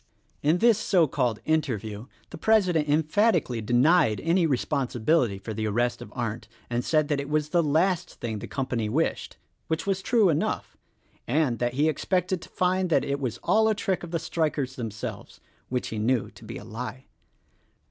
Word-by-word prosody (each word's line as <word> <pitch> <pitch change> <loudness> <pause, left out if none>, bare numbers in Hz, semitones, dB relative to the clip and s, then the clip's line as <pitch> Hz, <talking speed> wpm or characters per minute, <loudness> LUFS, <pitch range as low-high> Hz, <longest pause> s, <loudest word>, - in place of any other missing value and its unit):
In 155 +4 +3
this 225 +1 +4
so 180 -7 +3
called 125 -6 -1
interview 115 -8 -1 0.2
the - - -7
president 180 -9 +3
emphatically 155 - +2
denied 120 +2 +3
any 165 +1 +2
responsibility 130 -4 +1
for 110 +3 -6
the 110 +1 -2
arrest 120 +3 0
of - - -9
Arndt, 115 -3 -3 0.2
and 120 +1 0
said 155 +1 +2
that 145 -2 +1
it 140 0 -5
was 150 0 0
the 170 +2 +3
last 175 +4 +1
thing 110 -3 -4
the - - -7
company 125 -5 -2
wished 155 +9 -1 0.2
— - - -46
which 160 0 -2
was 195 -1 0
true 215 0 +3
enough 150 - -1 0.3
— - - -38 0.2
and 130 -3 +1
that 120 0 -1
he 150 +3 +3
expected 180 +3 0
to - - -12
find 185 0 0
that 165 - +2
it 140 0 -1
was 125 -4 -3
all 220 0 +3
a 215 - +2
trick 195 -3 -1
of 175 - -7
the 165 - -1
strikers 155 -5 -2
themselves 115 -5 -6 0.2
— - - -38
which 125 0 -2
he 110 - -4
knew 115 +1 0
to - - -16
be - - -7
a - - -9
lie. 125 +4 -7
145 Hz, 190 wpm, -26 LUFS, 120-175 Hz, 0.3 s, this